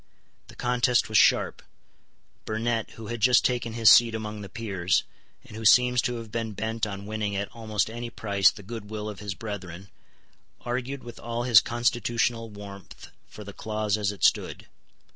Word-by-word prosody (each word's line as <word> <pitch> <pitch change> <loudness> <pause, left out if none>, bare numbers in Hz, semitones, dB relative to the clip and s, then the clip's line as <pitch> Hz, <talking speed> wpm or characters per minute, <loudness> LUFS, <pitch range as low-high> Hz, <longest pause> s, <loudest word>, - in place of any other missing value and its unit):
The - - -14
contest 125 -1 +1
was 110 - +4
sharp. - - +3 0.8
Burnet, 115 +1 -1
who 115 - -9
had 120 +1 -5
just 125 +3 +5
taken 120 -2 -1
his 115 -1 +1
seat 115 -1 +6
among 105 -1 -5
the 100 - -8
peers, 95 -6 0 0.4
and - - -12
who 110 - -7
seems 125 +2 +5
to 120 - -2
have 115 -2 -8
been 115 -2 -3
bent 110 +2 -2
on 100 -1 -7
winning 105 -1 -3
at 100 0 -4
almost 110 -3 -1
any 120 +1 -6
price 100 -4 +3
the 105 - -10
good 105 0 -8
will 105 -1 -5
of 105 -2 -7
his 100 -2 -5
brethren, 95 -2 -7 0.7
argued 130 +3 -4
with 120 -1 -10
all 120 +1 -3
his 120 -4 +7
constitutional 120 -1 0
warmth 100 -2 -11 0.2
for 105 - -11
the 100 0 -10
clause 105 -1 -2
as 105 -2 -1
it 100 - -10
stood. - - +1
110 Hz, 180 wpm, -26 LUFS, 105-120 Hz, 0.8 s, his